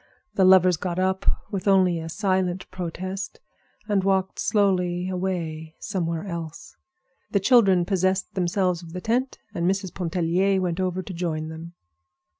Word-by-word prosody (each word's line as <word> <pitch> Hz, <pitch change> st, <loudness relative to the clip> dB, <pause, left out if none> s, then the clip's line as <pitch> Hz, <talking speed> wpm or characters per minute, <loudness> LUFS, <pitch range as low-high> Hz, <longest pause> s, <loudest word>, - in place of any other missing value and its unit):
The 190 Hz, -, +3 dB
lovers 185 Hz, -2 st, +6 dB
got 175 Hz, 0 st, -3 dB
up, 190 Hz, +1 st, 0 dB, 0.2 s
with 195 Hz, 0 st, -3 dB
only 185 Hz, -3 st, +4 dB
a 160 Hz, 0 st, -6 dB
silent 185 Hz, 0 st, 0 dB
protest, 185 Hz, +3 st, -5 dB, 0.5 s
and 205 Hz, -3 st, +1 dB
walked 190 Hz, -1 st, +1 dB
slowly 180 Hz, -4 st, +1 dB
away 170 Hz, -4 st, -3 dB
somewhere 170 Hz, -3 st, -3 dB
else. 165 Hz, -4 st, -7 dB, 0.5 s
The 200 Hz, -, +2 dB
children 195 Hz, -5 st, +5 dB
possessed 190 Hz, 0 st, 0 dB
themselves 180 Hz, -1 st, 0 dB
of 165 Hz, -1 st, -11 dB
the 180 Hz, -, -5 dB
tent, 250 Hz, +5 st, 0 dB, 0.2 s
and 170 Hz, +1 st, +1 dB
Mrs. 190 Hz, -1 st, -2 dB
Pontellier 180 Hz, +2 st, +1 dB
went 180 Hz, -1 st, -1 dB
over 185 Hz, 0 st, -1 dB
to 190 Hz, -, -7 dB
join 160 Hz, -3 st, -3 dB
them. 165 Hz, +2 st, -9 dB
185 Hz, 145 wpm, -25 LUFS, 170-190 Hz, 0.5 s, lovers